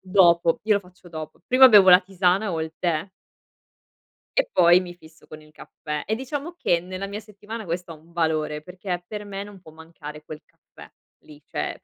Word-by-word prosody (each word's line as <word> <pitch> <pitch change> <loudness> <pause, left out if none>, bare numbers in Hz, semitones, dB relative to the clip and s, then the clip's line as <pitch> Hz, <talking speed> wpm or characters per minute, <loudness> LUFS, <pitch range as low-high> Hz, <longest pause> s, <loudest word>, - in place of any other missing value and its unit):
dopo, 175 -3 +3
io 215 -1 +3
lo 200 - +1
faccio 180 -1 -18
dopo, 155 -1 -8
prima 260 +1 +8
bevo 205 -5 +7
la 180 +1 +9
tisana 190 +1 0
o 165 - -2
il 160 0 -5
tè. 170 0 -1 1.3
E - - +2
poi 175 - +6
mi 180 -1 -7
fisso 160 -2 -19
con 155 0 -11
il 155 0 -19
caffè, 150 0 -7
e 220 - -1
diciamo 285 +7 -5
che 175 - +1
nella 185 +3 -6
mia 200 +1 -6
settimana, 215 +1 -9
questo 175 0 -4
ha - - -9
un 160 +2 -21
valore, 155 -3 -1
perché 180 +1 -6
per 210 +1 -7
me 200 -1 -6
non 205 -2 -13
può 160 -3 -15
mancare 155 -2 -11
quel 155 0 -10
caffè - - -17 0.3
lì, 150 -1 -16
cioè - - -4
è - - -20
180 Hz, 205 wpm, -24 LUFS, 160-200 Hz, 1.3 s, la